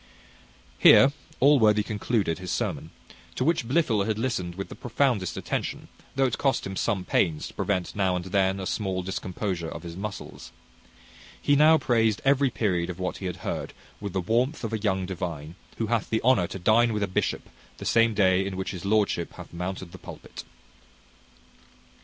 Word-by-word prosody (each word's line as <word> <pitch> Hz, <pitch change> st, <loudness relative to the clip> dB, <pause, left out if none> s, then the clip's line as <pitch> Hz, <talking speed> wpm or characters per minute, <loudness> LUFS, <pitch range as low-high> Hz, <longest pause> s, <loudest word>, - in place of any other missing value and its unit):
Here 135 Hz, -, +8 dB, 0.3 s
Allworthy 110 Hz, -7 st, +5 dB
concluded 105 Hz, -5 st, -1 dB
his 90 Hz, -1 st, -7 dB
sermon, -, -, -2 dB, 0.5 s
to -, -, -1 dB
which 150 Hz, -5 st, +1 dB
Blifil 120 Hz, -8 st, +2 dB
had 110 Hz, -1 st, 0 dB
listened 110 Hz, -8 st, -2 dB
with 95 Hz, +1 st, -6 dB
the -, -, -7 dB
profoundest 120 Hz, -6 st, 0 dB
attention, -, -, -4 dB, 0.3 s
though 135 Hz, 0 st, +3 dB
it 125 Hz, -, -1 dB
cost 135 Hz, -3 st, +1 dB
him 95 Hz, -, -5 dB
some 95 Hz, -3 st, -1 dB
pains 80 Hz, -5 st, +1 dB
to -, -, -12 dB
prevent 95 Hz, -3 st, -2 dB
now 95 Hz, -3 st, +1 dB
and 90 Hz, 0 st, -3 dB
then 95 Hz, 0 st, +1 dB
a 95 Hz, -, -4 dB
small 95 Hz, -2 st, -2 dB
discomposure 90 Hz, -2 st, -3 dB
of 80 Hz, -, -8 dB
his 85 Hz, -1 st, -7 dB
muscles. 95 Hz, -10 st, -7 dB, 0.9 s
He 145 Hz, -, +3 dB
now 155 Hz, +2 st, +6 dB
praised 115 Hz, -6 st, +2 dB
every 140 Hz, 0 st, +4 dB
period 90 Hz, -7 st, -1 dB
of 90 Hz, -, -5 dB
what 90 Hz, -1 st, -3 dB
he 95 Hz, -, -4 dB
had 90 Hz, 0 st, -5 dB
heard -, -, -3 dB, 0.3 s
with 100 Hz, -3 st, -5 dB
the 95 Hz, -, 0 dB
warmth 120 Hz, -, 0 dB
of 115 Hz, 0 st, -3 dB
a 110 Hz, -, -1 dB
young 95 Hz, -3 st, 0 dB
divine, 85 Hz, -4 st, -5 dB, 0.2 s
who 115 Hz, -, -1 dB
hath 115 Hz, -2 st, -1 dB
the 110 Hz, -, 0 dB
honour 120 Hz, -8 st, +4 dB
to -, -, -6 dB
dine 110 Hz, +5 st, +3 dB
with 105 Hz, -1 st, -1 dB
a -, -, 0 dB
bishop 95 Hz, -, -2 dB, 0.3 s
the -, -, -8 dB
same 115 Hz, -1 st, +3 dB
day 95 Hz, -2 st, +3 dB
in 95 Hz, -1 st, -4 dB
which 95 Hz, -, -3 dB
his 90 Hz, -3 st, -7 dB
lordship 100 Hz, -4 st, +1 dB
hath -, -, -11 dB
mounted 90 Hz, 0 st, -5 dB
the -, -, -11 dB
pulpit. -, -, -10 dB
100 Hz, 185 wpm, -26 LUFS, 90-115 Hz, 0.9 s, Here